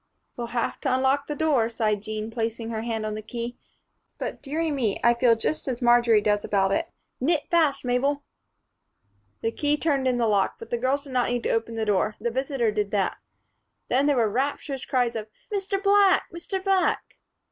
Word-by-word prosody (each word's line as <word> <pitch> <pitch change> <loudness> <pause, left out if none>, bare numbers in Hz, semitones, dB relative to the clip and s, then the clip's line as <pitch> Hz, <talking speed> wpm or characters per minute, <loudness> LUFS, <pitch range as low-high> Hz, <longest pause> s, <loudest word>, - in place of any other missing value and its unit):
"We'll 240 -1 -4
have 235 0 -2
to - - 0
unlock 270 +2 +1
the 295 - -3
door," 285 -8 +2
sighed 215 -3 0
Jean, 215 +1 -5
placing 230 0 -3
her 220 -1 -3
hand 225 -1 -3
on 215 - -2
the 215 - -5
key, 235 +2 -5 0.6
"but - - -5
dearie 315 +3 -2
me, 240 -8 0
I 235 - +6
feel 235 -1 +4
just 255 +8 -2
as 250 -3 -2
Marjory 240 -3 +5
does 205 0 +1
about 195 -1 +1
it. - - 0 0.3
Knit 295 +3 +2
fast, 315 -6 +2
Mabel." 275 +4 +1 1.2
The 225 - 0
key 295 +4 +1
turned 280 -4 +1
in 250 -1 +2
the 235 - +2
lock, 205 -3 +2
but 230 - -11
the 240 - +1
girls 265 +3 0
did 275 -3 -10
not 250 -1 +2
need 245 -1 -1
to - - 0
open 225 0 -1
the 220 -1 -1
door; 210 +1 +1
the 235 +2 -2
visitor 260 -2 0
did 210 -1 -1
that. 200 -2 0 0.7
Then 270 +3 +3
there 285 -2 +3
were 230 -2 +3
rapturous 270 +3 -2
cries 245 -3 +1
of 215 -1 -4 0.3
"Mr. 390 0 -1
Black! 400 -1 +5
Mr. 375 +3 -4
Black!" 385 -2 +1
240 Hz, 200 wpm, -25 LUFS, 225-285 Hz, 1.2 s, I